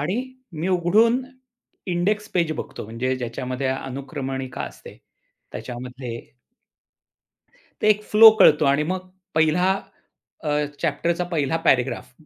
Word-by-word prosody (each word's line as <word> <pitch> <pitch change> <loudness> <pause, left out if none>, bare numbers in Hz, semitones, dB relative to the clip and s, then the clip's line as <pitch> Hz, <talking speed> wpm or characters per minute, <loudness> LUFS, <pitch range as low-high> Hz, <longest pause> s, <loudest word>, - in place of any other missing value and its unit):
आणि 180 +11 -1 0.3
मी 165 +4 -3
उघडून 215 +8 +3 0.6
index 205 +4 0
page 170 -3 +1
बघतो - - -6
म्हणजे 120 +4 -2
ज्याच्यामध्ये 125 +2 -4
अनुक्रमणिका 135 0 -4
असते. - - -10 0.6
त्याच्यामध्ये 125 -1 -7 1.7
एक 210 0 +3
फ्लो 220 +2 +9
कळतो 150 -5 +6
आणि 140 +2 +3
मग 185 +3 -4 0.3
पहिला 160 +4 +3 0.7
अ, 150 - -2 0.3
चॅप्टर 170 +1 0
चा 180 - -1
पहिला 155 -1 0
पॅरग्राफ 125 -1 +1
150 Hz, 110 wpm, -23 LUFS, 130-180 Hz, 1.7 s, फ्लो